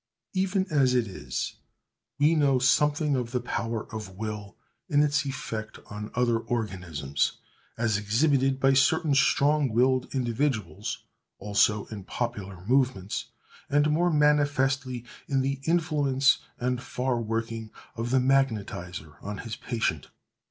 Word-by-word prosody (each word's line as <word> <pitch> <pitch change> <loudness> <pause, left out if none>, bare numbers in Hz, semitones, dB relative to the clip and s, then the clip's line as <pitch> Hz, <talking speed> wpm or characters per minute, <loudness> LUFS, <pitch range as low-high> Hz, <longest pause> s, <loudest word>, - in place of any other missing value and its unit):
Even 190 0 +1
as 135 -4 +3
it 120 -2 +3
is, 95 -3 -5 0.6
we 150 +3 +4
know 140 -4 +3
something 145 +3 +3
of 125 -2 -2
the 125 +1 -1
power 115 -2 -3
of 100 -4 -7
will 105 -2 -5 0.3
in 145 0 +4
its 145 -1 +1
effect 110 -5 -5
on 105 +1 -6
other 120 -2 +2
organisms, 90 - -2 0.4
as 110 -3 +1
exhibited 135 +5 +2
by 135 0 +4
certain 145 +3 +3
strong 140 +1 +3
willed 125 +3 +2
individuals; 120 - -2 0.3
also 105 +1 +2
in 100 -3 -7
popular 95 -5 -4
movements; 120 -6 +1 0.4
and 145 +1 +3
more 175 +3 +3
manifestly 140 -4 +2 0.2
in 135 -2 +1
the 135 +1 -1
influence 150 -5 +3 0.2
and 125 0 -1
far 125 -2 -1
working 115 0 -3 0.3
of 115 +1 -3
the 130 - +3
magnetizer 100 - -1
on 105 +1 -5
his 115 +1 -5
patient. 110 - -2
125 Hz, 130 wpm, -27 LUFS, 110-140 Hz, 0.6 s, we